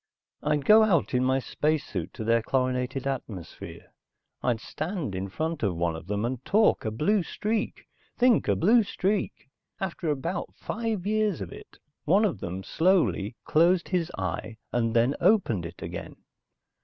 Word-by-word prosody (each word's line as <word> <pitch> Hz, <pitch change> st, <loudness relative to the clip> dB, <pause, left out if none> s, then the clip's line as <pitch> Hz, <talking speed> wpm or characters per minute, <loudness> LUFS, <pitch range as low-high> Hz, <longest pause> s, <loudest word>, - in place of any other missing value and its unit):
I'd 150 Hz, -1 st, 0 dB
go 215 Hz, +1 st, +8 dB
out 190 Hz, -11 st, +2 dB
in 125 Hz, 0 st, +2 dB
my 130 Hz, +1 st, +2 dB
spacesuit 135 Hz, -, -1 dB
into -, -, -7 dB
their 115 Hz, +1 st, +3 dB
chlorinated 130 Hz, +2 st, -1 dB
atmosphere, 115 Hz, -10 st, -6 dB, 0.5 s
I'd 120 Hz, -3 st, +1 dB
stand 155 Hz, -, -4 dB
in 95 Hz, +1 st, -3 dB
front 160 Hz, +8 st, -3 dB
of 100 Hz, -5 st, 0 dB
one 85 Hz, -1 st, 0 dB
of 80 Hz, +1 st, -9 dB
them 105 Hz, +2 st, -1 dB
and 125 Hz, +1 st, -3 dB
talk 215 Hz, -, +3 dB
a -, -, +1 dB
blue 170 Hz, -, +1 dB
streak, 215 Hz, +5 st, -3 dB, 0.3 s
think 245 Hz, -2 st, +4 dB
a -, -, +3 dB
blue 225 Hz, +7 st, +5 dB
streak. 200 Hz, -6 st, -2 dB, 0.3 s
After 185 Hz, -3 st, -3 dB
about 150 Hz, +5 st, -3 dB
five 220 Hz, -5 st, -3 dB
years 215 Hz, -3 st, +1 dB
of -, -, -6 dB
it, -, -, -13 dB, 0.3 s
one 195 Hz, +8 st, +4 dB
of 155 Hz, -, -1 dB
them 90 Hz, +2 st, -5 dB
slowly 160 Hz, -, +2 dB
closed 170 Hz, +3 st, +3 dB
his 180 Hz, -3 st, 0 dB
eye 95 Hz, +4 st, -4 dB, 0.2 s
and 115 Hz, -2 st, +1 dB
then 120 Hz, +4 st, +4 dB
opened 170 Hz, -, +3 dB
it 85 Hz, -, -11 dB
again. -, -, -6 dB
145 Hz, 160 wpm, -27 LUFS, -, 0.5 s, go